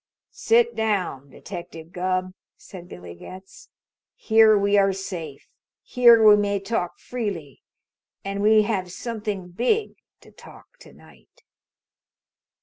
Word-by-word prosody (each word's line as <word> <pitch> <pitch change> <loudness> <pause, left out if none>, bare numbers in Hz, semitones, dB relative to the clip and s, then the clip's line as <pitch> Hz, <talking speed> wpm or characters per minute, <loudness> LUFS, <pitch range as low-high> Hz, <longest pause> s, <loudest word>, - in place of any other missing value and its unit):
"Sit 470 +1 +1
down, 185 -11 -2
Detective 165 +3 -10
Gubb," 185 0 -2 0.2
said 180 -2 -13
Billy 90 -1 -10
Getz. 185 - -13 0.5
"Here 220 -1 +4
we 200 0 +1
are 195 -1 +3
safe. 175 -7 -8 0.4
Here 235 -2 +5
we 210 - +9
may 205 -1 -1
talk 195 -3 -3
freely. 200 - -6 0.6
And 200 0 -4
we 215 +1 +4
have 190 -4 -3
something 210 -4 -5
big 250 - -1 0.2
to - - -18
talk - - -17
to - - -16
night." - - -22
195 Hz, 120 wpm, -23 LUFS, 180-220 Hz, 0.6 s, we